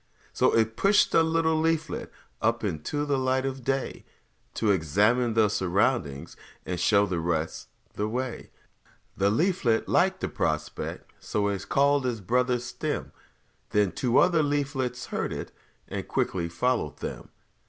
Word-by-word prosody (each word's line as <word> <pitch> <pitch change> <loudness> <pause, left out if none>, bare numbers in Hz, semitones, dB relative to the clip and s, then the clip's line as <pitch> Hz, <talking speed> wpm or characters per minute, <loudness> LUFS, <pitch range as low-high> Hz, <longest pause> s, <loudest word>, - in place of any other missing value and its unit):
So - - +3
it 110 0 +2
pushed 200 +1 +4
a - - +6
little 160 -1 +2
leaflet 160 -1 -1 0.3
Up 115 +1 +1
into 105 - -2
the 140 -2 +1
light 130 0 +1
of 135 -1 -4
day, 135 +2 -2 0.5
To 110 -2 +2
examine 105 +8 +2
the 110 -1 +5
surroundings 95 - 0 0.3
And 90 -1 -3
show 100 +3 +4
the 90 -3 -2
rest 80 -1 -2 0.3
the 105 - -2
way. 125 +1 -4 0.7
The 100 +1 +2
leaflet 135 - +1
liked - - +2
the - - 0
prospect, - - -3
So 100 -1 -1
it 100 -2 -4
called 140 -1 +3
its 120 -3 -2
brother, 125 +5 +1
Stem; 120 0 -4 0.6
Then 105 -3 +2
two 125 -1 +1
other 170 -3 +5
leaflets 140 -4 -1
heard - - -3
it, - - -5 0.4
And - - -5
quickly 85 -2 -1
followed 85 - -1
them. - - -6
120 Hz, 145 wpm, -27 LUFS, 100-135 Hz, 0.7 s, a